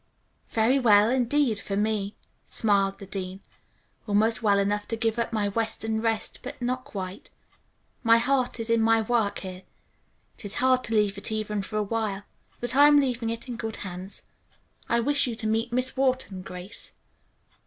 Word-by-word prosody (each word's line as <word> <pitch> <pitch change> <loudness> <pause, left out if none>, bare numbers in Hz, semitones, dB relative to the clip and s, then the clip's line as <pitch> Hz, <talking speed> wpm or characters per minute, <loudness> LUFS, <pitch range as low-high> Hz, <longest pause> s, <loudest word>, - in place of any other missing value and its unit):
"Very 235 +5 +2
well, 215 -2 +5
indeed, 255 -2 +2
for 195 +1 -4
me," 210 -1 -1 0.3
smiled 200 -3 +1
the 195 - -9
dean. 190 0 -5 0.7
"Almost 215 +3 +2
well 205 -3 +3
enough 205 +1 0
to 230 - -2
give 225 0 -1
up 235 - -1
my 215 -3 0
western 220 +1 -2
rest, 225 -1 -2
but - - -8
not 255 +1 -2
quite. 185 -2 -7 0.7
My 230 -1 +6
heart 250 0 +1
is 230 0 -2
in 230 -1 +3
my 225 0 +4
work 220 -3 +1
here. 185 -1 -7 0.8
It - - -9
is 200 - -3
hard 255 0 +3
to 225 - -2
leave 205 -2 +2
it 200 - -3
even 215 -1 -2
for 195 +3 -7
a - - +2
little 205 - -6
while. 205 -3 -2 0.4
But 245 +1 -3
I 285 +1 +8
am 295 0 +7
leaving 250 -4 0
it 230 +2 -5
in 245 -2 -5
good 225 -2 -4
hands. 185 +1 -8 0.7
I 235 - +3
wish 285 +2 +2
you 235 - -3
to 225 - -4
meet 225 +2 0
Miss 255 +2 +1
Wharton, 255 -8 0
Grace." 180 +1 -9
225 Hz, 185 wpm, -26 LUFS, 205-240 Hz, 0.8 s, I